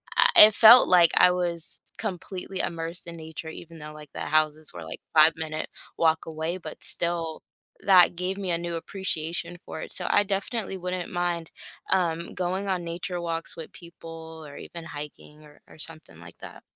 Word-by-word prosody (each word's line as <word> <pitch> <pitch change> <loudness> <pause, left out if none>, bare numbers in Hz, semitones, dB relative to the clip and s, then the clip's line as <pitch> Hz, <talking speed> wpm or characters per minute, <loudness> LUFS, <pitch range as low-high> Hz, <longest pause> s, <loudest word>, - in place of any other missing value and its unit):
I - - +6 0.2
it 215 - -3
felt 235 +2 +9
like 175 -2 +6
I 180 - +7
was 175 -2 -3 0.2
completely 190 -2 -4
immersed 165 +1 -5
in 170 0 -7
nature 160 0 -7
even 165 +1 -10
though, 150 -1 -7
like, 150 -2 -12
the - - -6
houses 155 0 0
were, 85 -2 -8
like, - - -8
5 155 0 +7
minute 155 -1 -4 0.3
walk 160 -1 +2
away, 160 +2 -3
but 160 -4 -9
still 170 -2 -2 0.4
that 180 -3 +6
gave 185 +2 -2
me 190 -3 -2
a 170 - +2
new 170 0 -4
appreciation 170 -1 -3
for - - -7
it, - - -8
so - - -2
I 205 - +4
definitely 200 +1 -2
wouldn't 180 -1 -4
mind, 175 -2 -1 0.4
um, 170 -3 0
going 185 +2 -2
on 185 -2 -1
nature 175 +1 -4
walks 165 -1 -4
with 165 -2 -9
people 165 -2 -11
or 140 -1 -11
even 170 -1 -9
hiking 150 0 -9
or 150 0 -19
or - - -16
something 155 - -3
like 85 0 -13
that. - - -10
170 Hz, 185 wpm, -26 LUFS, 160-180 Hz, 0.4 s, felt